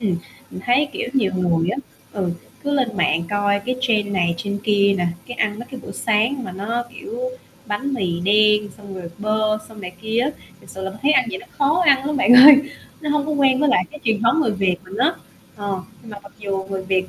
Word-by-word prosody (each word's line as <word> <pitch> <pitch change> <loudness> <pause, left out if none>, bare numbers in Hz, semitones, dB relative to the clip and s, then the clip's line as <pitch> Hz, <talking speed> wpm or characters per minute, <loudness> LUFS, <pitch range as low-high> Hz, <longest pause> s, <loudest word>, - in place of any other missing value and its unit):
Ừm, 195 -6 0 0.3
mình 185 - -8
thấy, 270 +4 +3
kiểu, - - -4
nhiều 220 -9 +1
người 175 -2 +1
á, 195 - -2 0.4
ừ, 190 -4 -2 0.3
cứ 285 - -1
lên 245 -6 0
mạng 170 -2 +2
coi 205 0 +1
cái 255 0 -1
trend 220 -5 +1
này 175 -3 +1
trend 200 +3 -4
kia 200 -2 +3
nè, 175 - 0 0.2
cái 245 - -7
ăn 210 -2 -1
mấy 240 - -8
cái 260 - -8
bữa - - -9
sáng 230 +5 0
mà 185 - -6
nó 230 +5 -3
kiểu 405 +7 -8 0.5
bánh 265 +7 -3
mì 175 -7 -2
đen, 210 +2 +3
xong 205 -2 -10
rồi 175 -2 -7
bơ 215 0 0
xong 220 -2 -12
này 180 -2 -7
kia 220 +2 -1
á, 270 - +1 0.3
thật - - -19
sự 190 - -8
là 190 - -3
thấy 290 - +4
ăn 260 -3 +4
vậy 190 - -4
nó - - -14
khó 300 +5 +2
ăn 275 -2 +4
lắm 295 - -1
bạn 250 -2 +4
ơi, 275 +3 +11 0.4
nó 300 -2 -3
hông 295 -1 0
có 305 - -1
quen 275 -2 +3
với 295 - +3
lại 185 -9 +3
cái 300 - -11
truyền 220 -2 +1
thống 235 +8 +3
người 280 - +1
Việt 190 -2 0
mình 185 +2 -10
á. 265 +8 +2 0.4
Ờ, 200 -2 -4 0.2
nhưng 225 - -12
mà 205 - -8
mặc 200 - -15
dù 195 -2 -3
người 190 -1 -3
Việt 185 -1 0
215 Hz, 240 wpm, -21 LUFS, 195-260 Hz, 0.5 s, ơi